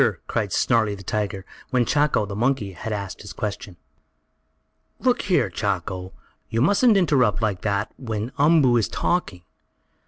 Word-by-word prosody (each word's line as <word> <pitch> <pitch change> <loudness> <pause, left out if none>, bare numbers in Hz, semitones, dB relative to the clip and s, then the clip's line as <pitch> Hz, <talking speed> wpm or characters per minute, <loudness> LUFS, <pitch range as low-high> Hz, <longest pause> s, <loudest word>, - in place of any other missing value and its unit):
cried 105 -4 -2
Snarlie, 110 0 +2
the 100 - -11
tiger, 100 -1 -3 0.2
when 125 -2 +2
Chako, 145 -5 +2
the 100 -1 -6
monkey, 120 -2 0
had 95 +5 -6
asked 100 -3 -5
his 105 - -9
question. 100 -3 -5 1.2
"Look 250 -1 +1
here, 175 - +2
Chako! 95 0 -3 0.4
You 115 - -1
mustn't 205 - +4
interrupt 135 - +3
like 105 -5 -1
that 100 -1 -1
when 115 -1 -4
Umboo 145 -5 +5
is 110 - 0
talking! 100 - -2
110 Hz, 145 wpm, -23 LUFS, 100-135 Hz, 1.2 s, Umboo